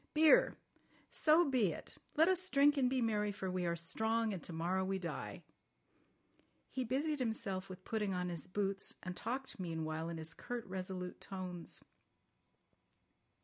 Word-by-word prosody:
"Beer! 320 +11 +6 0.5
So 320 +2 +5
be 245 -9 +3
it! - - -10 0.2
Let 320 +2 +6
us 370 0 +1
drink 285 0 +5
and 260 -3 +3
be 255 -1 +1
merry, 210 -2 +1
for 190 -2 -3
we 180 -1 0
are 170 - +1
strong, 220 +6 0
and 185 - -4
to - - -4
morrow 175 +3 0
we 190 +1 0
die." 175 -3 -5 1.3
He 260 - -1
busied 285 +5 0
himself 205 -6 -1
with 185 0 -9
putting 210 -3 0
on 180 -1 -1
his 170 0 -5
boots, 195 +1 0
and 180 0 -4
talked 260 +2 -4
meanwhile 160 -2 -2
in 170 - -4
his 160 0 -6
curt, 245 -2 -5
resolute 185 -1 -5
tones. 185 -3 -3
195 Hz, 155 wpm, -37 LUFS, 180-255 Hz, 1.3 s, Beer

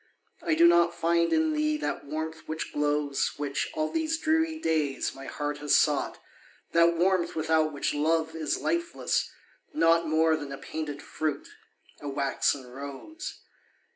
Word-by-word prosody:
I 160 -2 +1
do 165 +2 +6
not 170 0 +4
find 170 0 +2
in 320 -1 +2
thee 305 0 +1
that 300 - -3
warmth 160 +2 -5
which 160 0 -4
glows, 145 -1 0
Which, 145 -1 -2
all 155 0 -1
these 320 0 0
dreary 320 0 +1
days, 155 - 0
my 135 0 -10
heart 145 0 -3
has 145 0 +3
sought, - - +2 0.5
That 170 0 +4
warmth 180 -1 +2
without 155 0 +2
which 145 - -1
love 160 +2 +1
is 155 -2 -1
lifeless, 340 +1 -1 0.5
naught 165 - +4
More 160 +1 +3
than 145 -3 -6
a 140 - -5
painted 150 -1 -5
fruit, 150 -2 -3 0.5
a 145 - -5
waxen 135 -1 0
rose. 140 - -8
160 Hz, 150 wpm, -28 LUFS, 145-170 Hz, 0.5 s, do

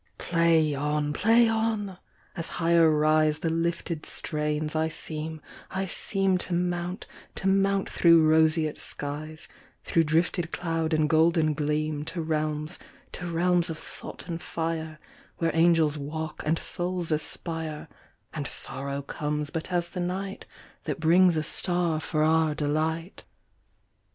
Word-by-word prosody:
Play 165 -3 +2
on! 150 +1 -1
Play 230 +7 +4
on! 220 -4 -1 0.4
As 165 -3 -4
higher 165 -1 +4
riseThe 155 +1 +2
lifted 165 -1 -2
strains, 150 0 -2
I 160 0 +1
seem, 155 0 -6 0.3
I 190 0 -2
seemTo 190 -1 0
mount, 175 +1 -2 0.3
to 190 - -2
mount 195 0 +2
through 165 -2 +5
roseate 155 -1 +3
skies, 155 +2 -4 0.4
Through 165 -1 +2
drifted 165 +2 +1
cloud 165 -2 -2
and 155 -1 +3
golden 160 0 +3
gleam, 150 0 -1
To 165 +1 -3
realms, 155 +1 -2 0.3
to 180 - -6
realms 175 +1 +2
of 160 - -4
thought - - -10
and 170 -1 -4
fire, 160 -1 -3 0.4
Where 165 -1 +1
angels 165 -3 +3
walk 155 +2 -5
and 160 +2 +2
souls 175 -1 -2
aspire, 155 0 -2 0.5
And 145 -3 -4
sorrow 140 +1 -2
comes 150 +1 -3
but 165 +3 -4
as 175 -1 0
the 180 - -6
nightThat 190 +3 -5
brings 170 +1 +4
a 155 - 0
star 175 0 +1
for 155 0 -1
our 160 -1 +3
delight. 160 +4 -2
160 Hz, 130 wpm, -27 LUFS, 155-175 Hz, 0.5 s, through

